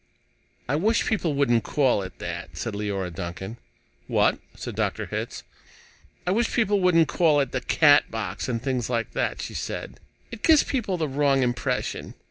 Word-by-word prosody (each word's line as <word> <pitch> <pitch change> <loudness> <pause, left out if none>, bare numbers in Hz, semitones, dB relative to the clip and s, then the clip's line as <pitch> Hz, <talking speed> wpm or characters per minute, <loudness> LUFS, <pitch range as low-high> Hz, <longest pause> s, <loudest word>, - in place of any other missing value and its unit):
"I 140 +4 +1
wish 220 +8 +2
people 175 -9 0
wouldn't 120 -5 +3
call 130 -8 +2
it 95 -1 -8
that," - - -6
said 115 - -3
Leora 100 -3 -3
Duncan. 95 +5 -6 0.5
"What?" - - +2 0.2
said - - -6
Dr. - - -1
Hitz. - - -5 0.8
"I 180 - +1
wish 225 +4 +1
people 205 -4 +2
wouldn't 170 -3 +4
call 155 -4 +3
it 135 -3 0
'the 130 - -2
Catbox,' 115 - +3
and 115 -2 -1
things 125 -2 -2
like 115 -3 -1
that," - - -2
she - - -6
said. - - -5 0.3
"It 230 - -8
gives 315 -3 +6
people 210 -9 -1
the 160 -2 -1
wrong 140 -1 +2
impression." 120 0 -2
135 Hz, 165 wpm, -25 LUFS, 115-175 Hz, 0.8 s, gives